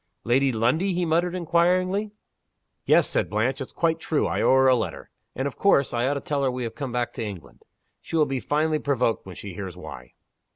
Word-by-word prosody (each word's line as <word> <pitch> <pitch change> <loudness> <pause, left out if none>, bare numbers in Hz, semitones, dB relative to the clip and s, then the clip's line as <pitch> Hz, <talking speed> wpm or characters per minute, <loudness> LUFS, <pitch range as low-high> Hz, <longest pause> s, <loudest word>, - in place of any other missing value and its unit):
"Lady 130 +3 +2
Lundie?" 130 - +1
he 180 0 0
muttered, 170 +2 +1
inquiringly. 185 +4 +1 0.8
"Yes," - - +4
said - - -1
Blanche. 115 +6 0
"It's 135 - -6
quite 165 -1 0
true; 155 -2 0
I - - -1
owe - - +3
her 130 0 +5
a 130 - +6
letter. 115 - -4 0.2
And 130 +2 -1
of 140 - -7
course 140 -9 +3
I 120 +1 +1
ought 145 - 0
to 140 - -3
tell 145 0 -2
her 135 - +2
we 125 0 -3
have 115 - -4
come 140 -4 -5
back 120 0 -2
to - - -4
England. 95 -10 -8 0.4
She - - -6
will 155 -2 +4
be 135 -2 -2
finely 155 +3 0
provoked 125 -8 0
when 95 - -9
she 100 +1 -8
hears 95 -1 -7
why!" 65 -8 -10
135 Hz, 220 wpm, -25 LUFS, 115-160 Hz, 0.8 s, a